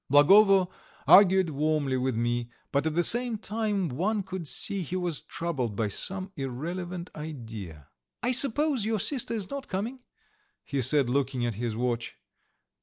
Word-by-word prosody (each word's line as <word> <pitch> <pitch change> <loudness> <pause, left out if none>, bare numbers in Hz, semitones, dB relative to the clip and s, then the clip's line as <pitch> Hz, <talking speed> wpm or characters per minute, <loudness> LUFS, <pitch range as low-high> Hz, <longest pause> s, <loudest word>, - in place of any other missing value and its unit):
Blagovo 195 +6 +6 0.4
argued 190 -3 +6
warmly 150 -2 0
with 130 -1 -1
me, 120 +1 -1 0.2
but 140 +2 +1
at 155 - -2
the 175 - +2
same 240 +3 +2
time 210 -3 -2
one 195 - -1
could 185 -3 -6
see 200 +6 -1
he 175 +2 -5
was 175 -5 -1
troubled 135 -11 -4
by 110 +1 0
some 190 - -2
irrelevant 170 +7 -5
idea. 110 - -8 0.4
"I 245 - +2
suppose 275 0 +3
your 220 +1 0
sister 245 0 0
is 200 -4 -5
not 280 -1 -5
coming?" 220 +8 -4 0.6
he 140 -2 -2
said, 135 +2 +4
looking 130 -1 0
at 120 - -1
his 115 +1 -3
watch. 120 0 -2
165 Hz, 155 wpm, -27 LUFS, 130-200 Hz, 0.6 s, Blagovo